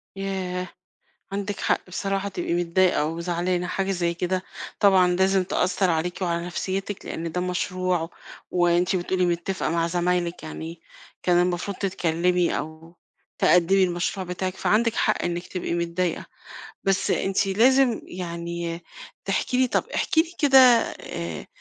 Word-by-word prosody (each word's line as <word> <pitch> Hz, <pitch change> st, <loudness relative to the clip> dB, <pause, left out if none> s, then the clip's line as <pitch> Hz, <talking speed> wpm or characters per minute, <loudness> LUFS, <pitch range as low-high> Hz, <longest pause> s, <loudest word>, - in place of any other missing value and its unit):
ياه! 185 Hz, -2 st, -3 dB, 0.6 s
عندِك 200 Hz, 0 st, -3 dB
حق -, -, 0 dB
بصراحة 195 Hz, +2 st, -2 dB
تبقي 180 Hz, -, -3 dB
متضايقة 175 Hz, -2 st, +2 dB
وزعلانة، 175 Hz, +2 st, -1 dB
حاجة 195 Hz, +2 st, -1 dB
زي 175 Hz, -2 st, 0 dB
كده 185 Hz, +2 st, -2 dB, 0.4 s
طبعًا 190 Hz, -3 st, +5 dB
لازم 190 Hz, 0 st, +3 dB
تأثّر 185 Hz, 0 st, +1 dB
عليكِ 170 Hz, +3 st, -1 dB
وعلى 170 Hz, -1 st, -1 dB
نفسيّتِك، 190 Hz, +3 st, -4 dB
لإن 165 Hz, 0 st, -4 dB
ده 180 Hz, -, -2 dB
مشروع 180 Hz, -2 st, -1 dB, 0.4 s
وأنتِ 175 Hz, +1 st, +2 dB
بتقولي 180 Hz, +1 st, 0 dB
متّفقة 175 Hz, +1 st, -1 dB
مع 165 Hz, +1 st, +1 dB
زمايلِك 175 Hz, 0 st, -1 dB
يعني 160 Hz, +1 st, -7 dB, 0.4 s
كان 175 Hz, -1 st, +3 dB
المفروض 180 Hz, +2 st, -1 dB
تتكلّمي 180 Hz, -2 st, +1 dB
أو 160 Hz, +2 st, -8 dB, 0.4 s
تقدّمي 185 Hz, +2 st, +4 dB
المشروع 180 Hz, +1 st, -1 dB
بتاعِك، 185 Hz, +1 st, -3 dB
فعندِك 230 Hz, +1 st, +2 dB
حق 215 Hz, -, +1 dB
إنِّك 175 Hz, 0 st, -3 dB
تبقي 180 Hz, -2 st, -3 dB
متضايقة. 170 Hz, +1 st, -1 dB, 0.6 s
بس 195 Hz, -1 st, +1 dB
أنتِ 195 Hz, +1 st, +1 dB
لازم 245 Hz, +4 st, +4 dB
يعني 170 Hz, -1 st, -5 dB, 0.4 s
تحكي 195 Hz, +5 st, 0 dB
لي، 255 Hz, 0 st, +4 dB
طَب -, -, +1 dB
احكي 320 Hz, -, +3 dB
لي 335 Hz, +1 st, -8 dB
كده 280 Hz, -3 st, +5 dB, 0.4 s
آآ 85 Hz, -3 st, -6 dB
180 Hz, 135 wpm, -24 LUFS, 170-195 Hz, 0.6 s, طبعًا